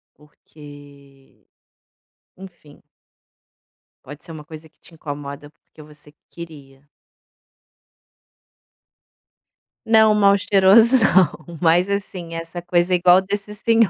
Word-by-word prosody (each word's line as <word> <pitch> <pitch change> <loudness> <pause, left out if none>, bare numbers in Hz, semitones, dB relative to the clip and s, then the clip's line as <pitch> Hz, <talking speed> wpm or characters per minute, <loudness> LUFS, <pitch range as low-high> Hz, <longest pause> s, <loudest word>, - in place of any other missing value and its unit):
Porque 145 -2 -19 0.9
enfim! 175 -6 -16 1.2
Pode 145 +3 -13
ser 165 - -12
uma 150 -2 -11
coisa 160 -1 -13
que - - -44
te 170 - -19
incomoda, 145 -1 -9
porque 155 0 -21
você 150 0 -18 0.2
queria. 145 -4 -14 3.0
Não, 220 -1 +4
mal 200 -1 +3
cheiroso 205 +6 +4
não, 180 -5 0
mas, 175 +3 +2
assim, 185 -4 -6
essa 165 +1 -8
coisa 175 +1 -1
igual 180 +1 +4
desse 205 +2 -6
senhor, 225 0 +1
170 Hz, 100 wpm, -19 LUFS, 150-195 Hz, 3.0 s, Não